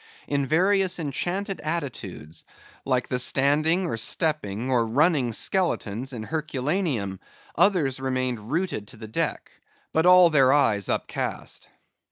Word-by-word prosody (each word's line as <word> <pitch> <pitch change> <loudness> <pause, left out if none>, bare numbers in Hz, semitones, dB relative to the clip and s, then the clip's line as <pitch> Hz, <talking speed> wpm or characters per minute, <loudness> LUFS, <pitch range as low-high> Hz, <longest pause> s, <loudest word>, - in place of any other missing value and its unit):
In 140 -1 -1
various 190 +4 +2
enchanted 180 +6 -3
attitudes, 105 - -5 0.4
like 130 -2 0
the 125 - -1
standing, 150 +8 +3
or 160 - -3
stepping, 125 - -1
or 120 -3 +2
running 140 0 +2
skeletons 130 - -1
in 115 -4 -6
Herculaneum, 145 - -2 0.4
others 155 -10 +2
remained 130 -4 -2
rooted 165 - -2
to 120 - -13
the 110 0 -9
deck; 110 - -2 0.4
but 160 +2 +2
all 180 -1 +7
their 135 -4 +5
eyes 105 -9 +2
upcast. - - -4
140 Hz, 125 wpm, -25 LUFS, 120-170 Hz, 0.4 s, all